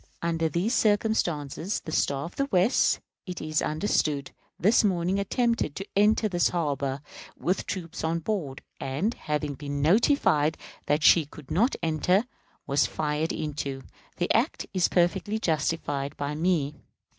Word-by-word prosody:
Under 165 -1 0
these 185 +9 0
circumstances, 200 - +1
the 160 - -7
Star 140 -2 0
of 175 - -9
the 275 - 0
West, 190 0 +3 0.3
it 180 -1 -5
is 155 0 -1
understood, 150 -4 0 0.3
this 210 +6 +4
morning 185 -1 +1
attempted 230 - 0
to 195 - -5
enter 210 +2 +4
this 175 -4 +2
harbor, 140 -5 -1 0.4
with 185 +2 -1
troops 175 -2 -5
on 160 +1 +1
board; 165 -7 -3 0.2
and, 145 - -1
having 150 - -3
been 140 0 -5
notified 160 - +3 0.3
that 150 +1 +1
she 160 -2 +6
could 150 -2 -13
not 220 - +2
enter, 170 - +2 0.4
was 140 +1 +2
fired 150 +1 -1
into. 140 -3 -4 0.3
The - - +1
act - - +1
is 185 -2 +3
perfectly 180 +4 +1
justified 150 -6 -1
by 145 +1 -2
me. 155 -2 +1
165 Hz, 145 wpm, -27 LUFS, 145-195 Hz, 0.4 s, she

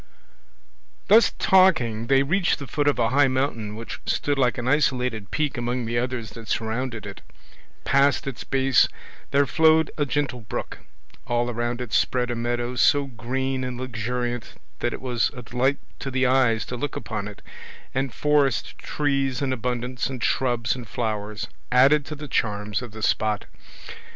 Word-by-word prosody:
Thus 225 +2 +6
talking 130 - +4
they 135 +1 +4
reached 175 +6 +1
the 140 - -7
foot 145 +1 -1
of 145 - +3
a 115 -2 +2
high 140 +2 +4
mountain 130 -5 -1
which 115 +1 -7
stood 145 -1 0
like 125 -1 +2
an 120 0 -3
isolated 125 -7 +1
peak 150 -3 -1
among 120 0 -2
the 120 +1 0
others 125 -3 -3
that 115 -2 -10
surrounded 115 -1 -2
it. 100 -1 -8 0.6
Past 140 +1 +3
its 135 -3 -5
base 135 -1 +3 0.4
there 140 +1 +3
flowed 160 +3 +4
a 145 - +1
gentle 140 -1 -1
brook, 105 - -5 0.5
all 120 0 0
around 120 +1 -2
it 120 -4 -6
spread 125 -1 +1
a - - -2
meadow 120 +1 -2
so 145 +3 +4
green 130 +2 -3
and 125 -1 -4
luxuriant 120 0 -3 0.2
that - - 0
it - - -6
was 125 -3 +1
a 125 - -8
delight 125 +5 +1 0.2
to 135 - -4
the 130 0 +1
eyes 125 -4 +3
to 125 - -5
look 145 +3 -3
upon 110 -3 -4
it, 105 - -11 0.5
and 135 0 -1
forest 145 -1 +1
trees 140 -3 -1
in 135 -2 0
abundance, 125 0 -2
and 130 -3 -5
shrubs 120 -2 +1
and 125 -3 -8
flowers, 105 -2 -3 0.2
added 140 +4 +5
to 150 - -6
the 150 0 -8
charms 105 -3 -1
of 120 -3 -8
the 110 0 -9
spot. 110 -1 +1
125 Hz, 170 wpm, -24 LUFS, 115-135 Hz, 0.6 s, Thus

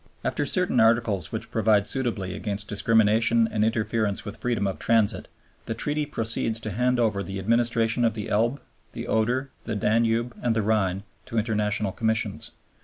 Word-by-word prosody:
After - - 0
certain - - +1
Articles 110 -6 +2
which 110 0 -5
provide 110 -2 +3
suitably 110 -8 -2
against 105 0 -2
discrimination 115 +2 +3
and 105 -1 -1
interference 110 -2 0
with 105 - -6
freedom 120 -5 -1
of 95 - -3
transit, 115 -3 +2 0.4
the 115 - -2
Treaty 145 +5 -1
proceeds 115 -3 0
to 110 - -4
hand 125 +4 +1
over 105 -4 +1
the 95 0 -5
administration 115 +3 +1
of 115 -2 +2
the 105 -2 -4
Elbe, 120 +6 +1 0.3
the - - -6
Oder, 125 +5 0
the 110 - -3
Danube, 115 +3 +1
and 120 -2 +1
the 110 - +1
Rhine 100 -3 0 0.2
to 115 - -4
International 105 -2 0
Commissions. 110 +2 -1
110 Hz, 165 wpm, -25 LUFS, 105-115 Hz, 0.4 s, provide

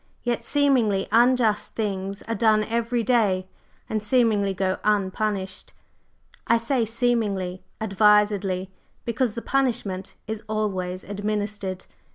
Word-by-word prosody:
Yet 240 -1 -1
seemingly 255 -9 +2
unjust 235 -2 +3
things 195 -2 -3
are 230 - -3
done 220 -2 +3
every 230 +1 -1
day, 210 -7 +2 0.4
and 215 -1 -2
seemingly 215 -3 +2
go 190 0 -1
unpunished. 200 -1 -1 0.7
I 230 - +5
say 230 +1 0
'seemingly' 215 -6 -1 0.2
advisedly, 205 -2 +2 0.3
because 235 -1 -1
the 230 - -5
punishment 235 -8 -1
is 220 0 -4
always 190 -4 -2
administered. 205 -2 -3
210 Hz, 110 wpm, -24 LUFS, 195-230 Hz, 0.7 s, I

